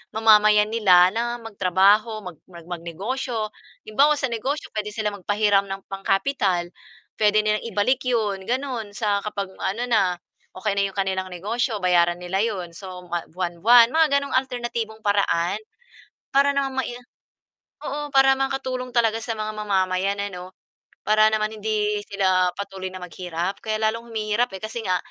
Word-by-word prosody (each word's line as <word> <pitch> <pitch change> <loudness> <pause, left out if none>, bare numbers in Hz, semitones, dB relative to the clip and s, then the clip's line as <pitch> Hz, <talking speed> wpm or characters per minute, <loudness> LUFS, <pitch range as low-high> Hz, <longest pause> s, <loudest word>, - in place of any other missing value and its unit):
mamamayan 215 -1 +5
nila 185 -6 +6
na 240 +1 -1
magtrabaho 205 +1 +2
mag 180 -4 -9
mag 170 -2 -13
mag-negosyo. 215 +8 -3 0.4
Halimbawa 280 +8 +4
sa 275 - 0
negosyo 265 +6 -3
pwede 210 0 -3
silang 210 -1 -2
magpahiram 205 -1 +3
ng 195 0 -7
pangkapital 195 -2 0 0.5
pwede 215 0 +4
nilang 215 0 0
ibalik 250 +6 +1
yun 210 -6 0
ganun 245 -4 -2
sa 205 -3 0
kapag 200 -2 -3
ano 210 +6 -2
na 230 -4 +3 0.6
okey 205 +2 -1
na 200 - +3
'yong 195 - -11
kanilang 190 -1 -1
negosyo 215 +5 -2
bayaran 175 -1 +3
nila 180 +2 -1
yun. 190 -7 -2
So 180 0 -9
buwa 175 -1 -2
buwan-buwan 185 +7 +4
mga 320 0 +5
ganong 280 - -6
alternatibong 240 -4 -3
paraan 200 -3 +1 0.8
para 280 +1 +4
naman 270 -1 -1
mai - - -5 0.9
Oo, 295 0 -4
para 270 0 +6
makatulong 265 -1 -2
talaga 225 -2 +2
sa 225 -1 -4
mga 215 0 -3
ma 215 - -4
mamayan 190 0 +1
na 200 - -1
ano 180 -1 -7 0.6
para 215 0 +4
naman 215 0 0
hindi 210 -1 0
sila 185 -2 +2
patuloy 195 -2 -5
na 185 - -8
maghirap 180 +1 -4
kaya 215 -1 -1
lalong 230 +2 -1
humihirap 220 +2 0
eh, - - -16
kasi 220 +2 -4
nga 185 -1 +2
210 Hz, 155 wpm, -23 LUFS, 190-230 Hz, 0.9 s, nila